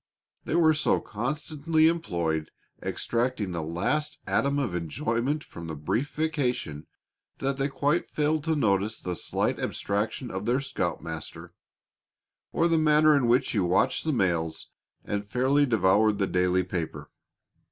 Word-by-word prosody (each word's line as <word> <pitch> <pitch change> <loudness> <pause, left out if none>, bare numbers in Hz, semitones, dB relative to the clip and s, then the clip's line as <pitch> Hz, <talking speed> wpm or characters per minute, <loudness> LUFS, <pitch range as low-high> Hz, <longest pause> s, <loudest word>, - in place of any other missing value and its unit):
They - - -1
were 160 -2 +5
so 150 0 +2
constantly 150 +6 0
employed 85 - -1 0.3
extracting 115 -4 -1
the 85 -2 -3
last 90 - -1
atom 140 +1 +1
of 135 -10 -1
enjoyment 115 - -1
from 85 -1 -9
the 80 - -5
brief 110 - -2
vacation 135 - -1 0.5
that 135 0 -1
they 135 0 +1
quite 145 +4 0
failed 150 0 0
to 160 -1 +1
notice 105 -4 +1
the 90 -1 -4
slight - - -1
abstraction 105 +5 -2
of 95 +3 -4
their 125 +3 +2
scoutmaster, 85 - -4 1.0
or 165 - +2
the 165 -1 +3
manner 155 0 +5
in 135 -4 +2
which 125 +3 +3
he 110 - +1
watched 95 +8 +2
the 160 - 0
mails 85 - -1 0.3
and 100 0 -3
fairly 135 +5 +3
devoured 105 -1 +3
the 100 - +1
daily 90 0 +2
paper. 90 -3 -5
120 Hz, 140 wpm, -27 LUFS, 90-150 Hz, 1.0 s, were